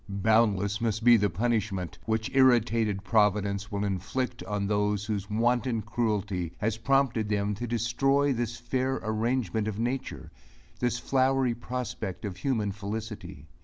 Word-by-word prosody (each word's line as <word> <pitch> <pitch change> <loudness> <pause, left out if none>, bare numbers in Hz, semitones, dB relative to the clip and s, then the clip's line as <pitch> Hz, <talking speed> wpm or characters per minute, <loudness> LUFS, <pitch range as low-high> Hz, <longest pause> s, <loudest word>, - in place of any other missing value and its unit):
Boundless 105 0 +2
must 110 -1 -1
be 120 0 +8
the 105 -2 +2
punishment, 100 -2 -1
which 110 0 -1
irritated 115 -6 +3
providence 100 -1 +1
will 100 0 -2
inflict 110 +6 -2
on 105 -1 -2
those 105 0 0
whose 105 -2 -3
wanton 115 +1 +1
cruelty 105 -6 -1
has 110 0 -1
prompted 120 -3 +1
them 105 0 0
to 120 +4 -4
destroy 135 +5 +2
this 120 -1 -3
fair 130 +2 -1
arrangement 110 0 0
of 105 -2 -3
nature 125 +4 -3 0.5
this 120 -1 0
flowery 130 0 +2
prospect 120 -5 -5
of 100 -2 -5
human 110 -3 0
felicity. 105 +2 -6
110 Hz, 135 wpm, -28 LUFS, 105-120 Hz, 0.5 s, be